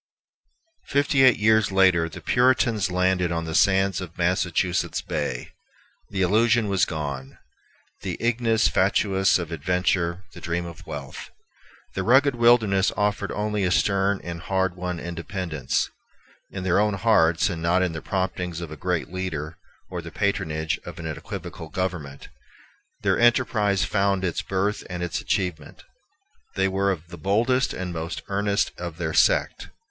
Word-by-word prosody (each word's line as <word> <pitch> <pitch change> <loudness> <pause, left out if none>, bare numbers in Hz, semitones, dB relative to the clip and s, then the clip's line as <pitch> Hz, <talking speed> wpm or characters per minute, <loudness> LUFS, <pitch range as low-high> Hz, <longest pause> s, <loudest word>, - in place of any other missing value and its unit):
Fifty 140 -1 +2
eight 130 -3 +6
years 110 -1 +3
later 95 -4 +4
the 75 - -10
Puritans 120 -5 +2
landed 90 -1 +1
on 85 -1 -2
the 80 - -5
sands 95 0 +3
of 85 -3 -9
Massachusetts 90 0 0
Bay. - - -3 0.6
The 95 -2 -1
illusion 110 +3 +3
was 95 -2 +3
gone, 70 -4 -5 0.6
the 90 -2 -4
ignis 115 -5 +2
fatuus 95 +2 +2
of 85 -2 -5
adventure, 90 +2 0
the - - -11
dream 85 0 -2
of 85 -2 -10
wealth. - - -7 0.6
The 95 - -2
rugged 130 +7 +4
wilderness 115 -5 +4
offered 105 -1 0
only 105 -1 -1
a 90 - +2
stern 100 +1 +2
and 85 -1 -6
hard 95 0 0
won 90 -1 -4
independence. 85 -4 -3 0.6
In 95 - -6
their 90 +1 +2
own 105 -1 +2
hearts, 85 -7 +3
and 85 -2 -5
not 90 +3 +2
in 90 - 0
the 80 -1 -6
promptings 90 -3 -2
of 85 -3 -7
a - - -6
great 90 +2 -2
leader 80 -4 -4 0.3
or 90 -1 -4
the 85 - -8
patronage 80 -5 -1
of 85 0 -9
an 80 - -7
equivocal 80 0 -7
government, 80 -6 -4 0.8
their - - +2
enterprise 115 -5 +3
found 100 -2 +1
its 85 -3 -1
birth 95 +2 -1
and 90 -1 -4
its 90 -1 -2
achievement. 90 -6 -3 0.7
They 95 0 +2
were 95 +1 0
of 85 -3 -3
the 85 -1 -10
boldest 120 - +1
and 90 -1 -4
most 80 +1 -5
earnest 100 0 0
of 85 -2 -6
their 80 -3 -3
sect. - - +2
95 Hz, 155 wpm, -24 LUFS, 85-100 Hz, 0.8 s, eight